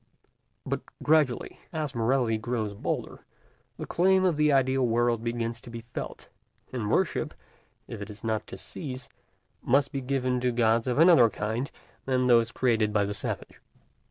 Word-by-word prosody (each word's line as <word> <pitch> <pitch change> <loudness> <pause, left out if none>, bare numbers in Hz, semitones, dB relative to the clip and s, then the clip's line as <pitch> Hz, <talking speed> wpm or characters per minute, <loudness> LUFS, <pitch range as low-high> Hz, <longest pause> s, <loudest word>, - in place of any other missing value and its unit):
But - - -2 0.2
gradually, 150 -5 +2
as 155 -4 -3
morality 115 -1 +1
grows 110 -3 -2
bolder, 100 - -4 0.5
the - - -5
claim 190 +2 +3
of 180 -4 +3
the 150 0 +3
ideal 135 -1 +3
world 120 -1 +1
begins 115 0 -2
to 120 - -11
be 115 0 -7
felt; 115 +1 -7 0.5
and 110 -5 -2
worship, - - 0 0.5
if - - -7
it 100 - -6
is 105 +1 -9
not 110 -1 -1
to - - -8
cease, 130 -5 -7 0.5
must 140 +2 +2
be 135 - -3
given 130 -1 0
to 125 0 +1
gods 115 -1 +2
of 125 - 0
another 160 -8 +7
kind 110 +6 -3 0.4
than 130 -1 +1
those 115 -2 +4
created 115 -4 +1
by 105 -1 +2
the 100 - -3
savage. - - -5
120 Hz, 160 wpm, -28 LUFS, 115-135 Hz, 0.5 s, another